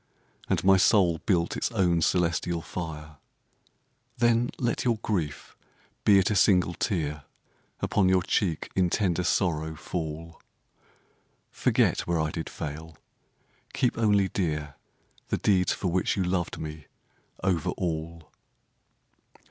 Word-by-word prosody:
And - - +1
my 95 0 +6
soul 90 -4 +4
built 85 -4 +1
its - - -2
own 90 -5 +2
celestial 85 0 0
fire. 75 -4 -7 1.0
Then 120 +1 +3
let 120 -2 -1
your 120 -3 +1
grief, 85 -9 -3 0.5
be 100 -2 +7
it 95 +2 +2
a - - +1
single 90 -2 +4
tear. 75 -6 -2 0.6
Upon 95 -3 +2
your 95 -1 +3
cheek 85 -4 -1
in 90 -2 +2
tender 90 -3 0
sorrow 80 -4 0
fall. 80 +1 -6 1.1
Forget - - +1
where 85 -1 +1
I 80 0 0
did 80 0 -5
fail; 75 +1 -7 0.8
keep 125 -3 +1
only 105 -4 +3
dear 75 -6 -2 0.5
The - - -1
deeds 95 -3 +2
for 95 - -2
which 90 +1 0
you 95 - +1
loved 90 -1 -1
me 75 -2 -7 0.6
over 90 -5 +1
all. 80 -1 -4
85 Hz, 125 wpm, -27 LUFS, 80-95 Hz, 1.1 s, be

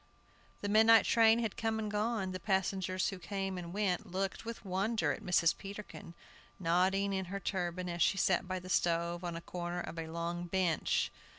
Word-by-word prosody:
The 205 - -2
midnight 220 +2 +6
train 225 -1 +5
had 225 -3 -2
come 225 -1 -1
and 215 -1 -3
gone. 210 -2 -1
The 185 - -4
passengers 190 0 0
who 195 - -6
came 195 0 -3
and 175 -2 -6
went 190 -3 -1
looked 195 +3 -2
with 230 -2 -7
wonder 190 -3 0
at 135 - -4
Mrs. 170 -2 +3
Peterkin, 200 -4 -9 0.4
nodding 190 +3 +2
in 190 -1 -1
her 200 +3 -4
turban, 180 -1 -2
as 170 -1 -4
she 195 - +3
sat 185 -1 +2
by 185 0 -2
the 185 0 -8
stove, 170 0 +1
on 175 -1 -3
a 165 - -5
corner 175 0 -4
of 165 - -6
a 160 - -4
long 170 +1 -4
bench. 175 -3 +1
185 Hz, 190 wpm, -33 LUFS, 175-200 Hz, 0.4 s, midnight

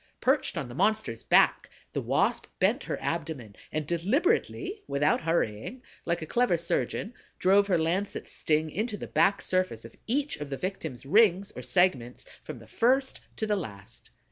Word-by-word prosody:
Perched 265 - +1
on 150 -6 -3
the 120 - -9
monster's 185 - 0
back, - - +4 0.2
the - - -1
Wasp - - +1
bent - - +1
her - - -3
abdomen 130 -10 -4 0.2
and 155 -1 -2
deliberately, 285 - 0
without 145 +2 +2
hurrying, 165 - -1 0.2
like 170 -1 -1
a - - -4
clever 240 0 +2
surgeon, 170 +6 -2 0.2
drove 200 +2 +4
her 185 -3 +3
lancet 175 +5 -1
sting 155 0 0
into 215 +3 -2
the - - -6
back 170 +6 +2
surface 185 -12 0
of 115 - -12
each 280 +5 0
of 150 -1 -6
the 135 - -3
victim's 160 -9 -5
rings 200 +3 +4
or - - -8
segments, 135 -10 +1 0.2
from - - -8
the - - -13
first 265 +3 +1
to 220 - -2
the 210 -1 +1
last. 105 - -8
175 Hz, 170 wpm, -28 LUFS, 145-215 Hz, 0.2 s, back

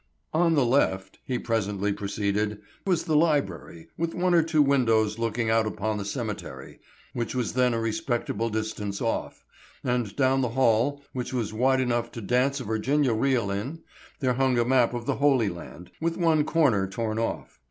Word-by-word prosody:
"On 165 0 +3
the 140 -4 +3
left," 115 -7 +1
he 125 - -1
presently 105 -4 -1
proceeded, 105 +1 -2 0.3
"was 175 -4 +2
the 155 - 0
library, 95 - 0
with 165 0 -1
one 180 0 +1
or 170 - +6
two 160 -2 +3
windows 115 -6 +2
looking 115 0 0
out 110 -1 +3
upon 110 0 -2
the 100 - -4
cemetery, 100 - -6 0.3
which 120 +1 -3
was 125 -3 -1
then 125 -2 +2
a - - 0
respectable 115 -2 -1
distance 110 -2 -3
off; 115 - -3 0.4
and 120 -5 -1
down 135 -1 +2
the 125 - 0
hall, 135 +3 +2
which 125 0 -4
was 115 -4 -2
wide 130 +4 +2
enough 120 -2 -1
to - - -6
dance 125 +6 +1
a - - -5
Virginia 125 +4 +1
reel 115 -3 +1
in, 130 +12 -4 0.4
there 130 -2 +2
hung 130 0 +1
a 120 - +2
map 125 -1 +3
of 120 -1 -5
the - - -1
Holy 135 -7 +3
Land, 85 0 -10
with 165 0 -1
one 160 -4 +3
corner 130 -14 +2
torn 110 +2 -3
off. 115 - -4
120 Hz, 180 wpm, -26 LUFS, 110-135 Hz, 0.4 s, or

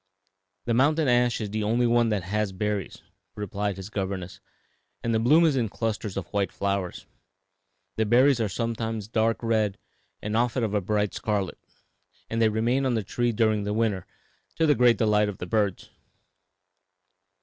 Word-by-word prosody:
"The 120 - 0
mountain 150 +5 +3
ash 120 -1 +3
is 105 -3 -4
the 110 +1 -2
only 115 +4 +2
one 120 -1 +3
that 105 -4 -1
has 105 +2 -1
berries," 105 0 -3 0.3
replied 105 -1 -3
his 95 +2 -8
governess, 95 -1 -4 0.6
"and 115 - 0
the 110 - +2
bloom 150 +9 +5
is 155 -4 +3
in 120 -5 0
clusters 110 -2 -3
of 95 - -3
white 100 -3 0
flowers. 100 -2 -3 0.9
The 110 -1 +1
berries 125 +3 +4
are 110 - 0
sometimes 115 -1 -3
dark 115 +1 0
red 110 -3 +1 0.4
and 105 +1 -3
often 120 +1 +1
of 105 -2 -1
a 105 - +1
bright 105 +1 0
scarlet, 100 -4 -2 0.7
and 115 0 0
they 110 - +5
remain 115 +5 +1
on 125 - +1
the 110 - -1
tree 120 +5 -1
during 110 -2 +1
the 105 +1 -2
winter, 105 -5 0 0.5
to 160 - +2
the 150 - +5
great 125 -3 +4
delight 105 -2 +2
of 100 - -6
the - - -5
birds. 100 -1 -1
110 Hz, 170 wpm, -26 LUFS, 100-120 Hz, 0.9 s, bloom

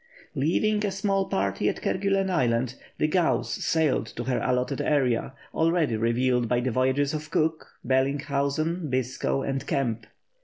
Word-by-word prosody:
Leaving 210 +9 +1
a 205 - +1
small 195 0 0
party 100 +2 0
at - - -3
Kerguellen 195 0 0
Island, 125 -5 +1 0.2
the 155 - +2
Gauss 175 +1 +1
sailed 155 -8 +1
to 120 - -3
her 125 0 0
allotted 125 +2 0
area, 130 -4 +1 0.2
already 160 -6 +2
revealed 120 +1 +1
by 125 - +2
the 125 +1 -1
voyages 130 +4 +1
of 155 0 -5
Cook, 160 0 0 0.2
Bellinghausen, 140 +5 0
Biscoe, 130 +1 -1
and 135 -1 -2
Kemp. 115 -5 -1
135 Hz, 145 wpm, -26 LUFS, 125-160 Hz, 0.2 s, the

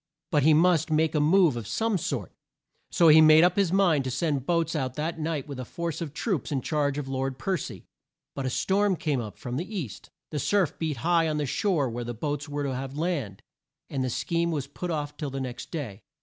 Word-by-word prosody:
But 150 - +3
he 155 +2 +5
must 165 0 +3
make 155 0 +2
a 155 - +2
move 160 -1 +4
of 115 -4 -5
some 225 - 0
sort, 125 - -3 0.6
so 170 - +4
he 155 +1 +8
made 155 +1 +8
up 180 0 +4
his 195 -4 +2
mind 180 -7 +3
to - - -1
send 140 -1 -1
boats 170 -2 +1
out 130 -4 -2
that 160 +2 -3
night 155 -3 -2
with 140 -3 -7
a - - -3
force 170 +5 -4
of 160 -4 -4
troops 160 - -2
in 135 -4 -1
charge 145 -2 0
of 145 -2 -4
Lord 135 0 -2
Per 190 +7 -1
cy. - - -6 0.5
But 135 -2 -3
a - - 0
storm 195 +7 +1
came 145 -6 -1
up 105 -3 -8
from 125 0 -5
the 190 +7 -5
east; 120 - -6 0.2
the 150 - -2
surf 195 +2 +1
beat 155 -4 -2
high 170 -1 +3
on 155 -1 -1
the 150 - 0
shore 155 0 +1
where 120 0 -4
the 120 0 -5
boats 145 +4 -3
would 145 0 -2
have 135 0 -3
to - - -5
land; 145 - -2 0.5
and 135 -2 -1
the 130 - -1
scheme 170 +7 -1
was 150 -5 -2
put 160 +5 -6
off 145 -3 -3
till 150 - -3
the 135 0 -5
next 125 -2 -6
day. 120 - -5
150 Hz, 235 wpm, -27 LUFS, 135-170 Hz, 0.6 s, he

